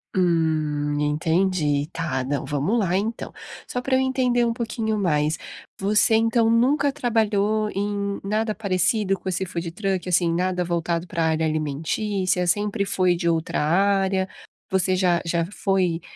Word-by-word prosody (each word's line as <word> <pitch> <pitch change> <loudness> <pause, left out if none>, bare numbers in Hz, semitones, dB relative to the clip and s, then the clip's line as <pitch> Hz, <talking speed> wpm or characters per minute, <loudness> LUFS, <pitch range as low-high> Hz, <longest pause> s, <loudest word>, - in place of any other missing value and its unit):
Hum, 155 -4 +1
entendi. 150 -1 +1
Tá, 145 -6 -2
não, 140 +2 -2
vamo 150 +10 -1
lá 190 -5 +1
então, 220 +3 -3 0.4
só 250 - -3
pra 260 +1 0
eu - - +3
entender 255 -2 +1
um 235 - +1
pouquinho 225 -2 -2
mais, 155 -4 +1 0.4
você 210 +3 +3
então 225 0 +3
nunca 275 +5 +3
trabalhou 215 -5 +1
em 200 0 -2
nada 215 +2 -1
parecido 195 0 +1
com 190 - -5
esse 185 +1 -1
food 170 -1 -4
truck, 190 -1 -2
assim, 175 -1 +2
nada 180 +1 0
voltado 170 0 -1
pra 165 -1 -1
área 160 0 +1
alimentícia, 175 +5 -1
sempre 205 +2 +1
foi 185 -3 +2
de 170 -1 0
outra 165 -2 -1
área? 190 +3 +2 0.4
Você 185 0 +2
já 180 -2 +2
já 170 0 0
foi 185 -5 0
185 Hz, 150 wpm, -23 LUFS, 165-210 Hz, 0.4 s, eu